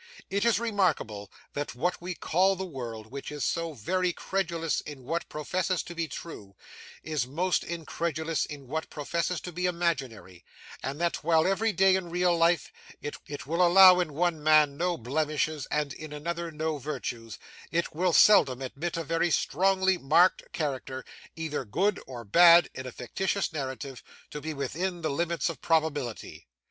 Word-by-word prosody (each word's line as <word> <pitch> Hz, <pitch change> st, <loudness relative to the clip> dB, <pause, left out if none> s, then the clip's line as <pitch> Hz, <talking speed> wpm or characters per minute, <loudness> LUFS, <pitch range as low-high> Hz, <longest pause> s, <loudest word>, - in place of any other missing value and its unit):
It 200 Hz, +3 st, +1 dB
is 225 Hz, -4 st, +3 dB
remarkable 175 Hz, -, -1 dB, 0.2 s
that 145 Hz, -3 st, -4 dB
what 175 Hz, +9 st, -1 dB
we 180 Hz, 0 st, -4 dB
call 190 Hz, +5 st, +2 dB
the 190 Hz, +1 st, -4 dB
world, 115 Hz, -8 st, -7 dB
which 140 Hz, +1 st, -6 dB
is 150 Hz, -2 st, -3 dB
so 165 Hz, -1 st, -1 dB
very 180 Hz, -, 0 dB
credulous 170 Hz, -3 st, -2 dB
in 145 Hz, -3 st, -9 dB
what 165 Hz, +6 st, -3 dB
professes 180 Hz, +4 st, -1 dB
to 175 Hz, -, -8 dB
be 165 Hz, -1 st, -2 dB
true, 105 Hz, -10 st, -9 dB, 0.5 s
is 155 Hz, -5 st, -2 dB
most 175 Hz, +7 st, 0 dB
incredulous 165 Hz, -1 st, -2 dB
in 140 Hz, -3 st, -9 dB
what 160 Hz, +4 st, -3 dB
professes 170 Hz, +4 st, -2 dB
to 180 Hz, -, -7 dB
be 180 Hz, +2 st, -1 dB
imaginary; 135 Hz, -, -3 dB, 0.4 s
and 135 Hz, +3 st, -4 dB
that, 170 Hz, 0 st, -1 dB
while, 160 Hz, -1 st, +3 dB
every 215 Hz, +4 st, +2 dB
day 190 Hz, -1 st, +4 dB
in 185 Hz, -2 st, -3 dB
real 175 Hz, 0 st, +2 dB
life, 165 Hz, -2 st, +2 dB, 0.3 s
it 145 Hz, 0 st, -7 dB
will 165 Hz, +5 st, +1 dB
allow 180 Hz, +1 st, +8 dB
in 155 Hz, -5 st, -2 dB
one 170 Hz, -1 st, 0 dB
man 155 Hz, -2 st, +5 dB
no 175 Hz, +2 st, 0 dB
blemishes, 150 Hz, +3 st, -1 dB
and 150 Hz, -2 st, -1 dB
in 155 Hz, +1 st, -9 dB
another 170 Hz, +3 st, -4 dB
no 155 Hz, -1 st, -2 dB
virtues, 120 Hz, -5 st, -5 dB, 0.3 s
it 170 Hz, +1 st, -1 dB
will 180 Hz, +3 st, +1 dB
seldom 145 Hz, -9 st, +6 dB
admit 155 Hz, +7 st, -4 dB
a 165 Hz, -, -2 dB
very 165 Hz, +2 st, 0 dB
strongly 190 Hz, +1 st, +2 dB
marked 165 Hz, +7 st, +3 dB
character, 130 Hz, -4 st, -4 dB, 0.3 s
either 160 Hz, -4 st, -3 dB
good 195 Hz, -, 0 dB
or 120 Hz, -3 st, -8 dB
bad, 170 Hz, -, +7 dB
in 130 Hz, 0 st, -6 dB
a -, -, -6 dB
fictitious 190 Hz, -, -2 dB
narrative, 135 Hz, -2 st, -5 dB, 0.3 s
to 150 Hz, -, -6 dB
be 160 Hz, -, -4 dB
within 170 Hz, +5 st, -3 dB
the 155 Hz, -, 0 dB
limits 170 Hz, +4 st, -1 dB
of 165 Hz, -, -5 dB
probability. 150 Hz, -, -1 dB
160 Hz, 165 wpm, -28 LUFS, 140-175 Hz, 0.5 s, allow